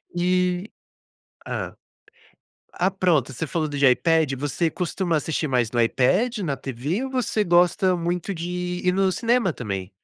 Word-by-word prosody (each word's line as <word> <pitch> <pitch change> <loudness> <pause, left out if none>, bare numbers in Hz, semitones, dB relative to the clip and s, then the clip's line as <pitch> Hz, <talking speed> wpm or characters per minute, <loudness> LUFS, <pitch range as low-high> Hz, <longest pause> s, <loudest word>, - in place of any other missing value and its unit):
E 180 +2 +1 0.8
hã. - - -4 1.0
Ah, 185 - +2
pronto, 175 -9 +1
você 135 +6 -4
falou 155 +1 -1
de 145 -1 +1
iPad, 155 +3 +3
você 145 +5 -1
costuma 175 0 -1
assistir 155 +1 -1
mais 125 -4 +1
no 120 - 0
iPad, 185 - +2
na 150 -8 -2
TV 140 - -3
ou 265 - -5
você 245 -4 0
gosta 180 +1 +3
muito 175 +3 -2
de 170 0 -5
ir 180 0 -3
ir - - +5
no 190 +1 +2
cinema 230 -2 +1
também? 100 -5 -5
175 Hz, 155 wpm, -23 LUFS, 140-185 Hz, 1.0 s, ir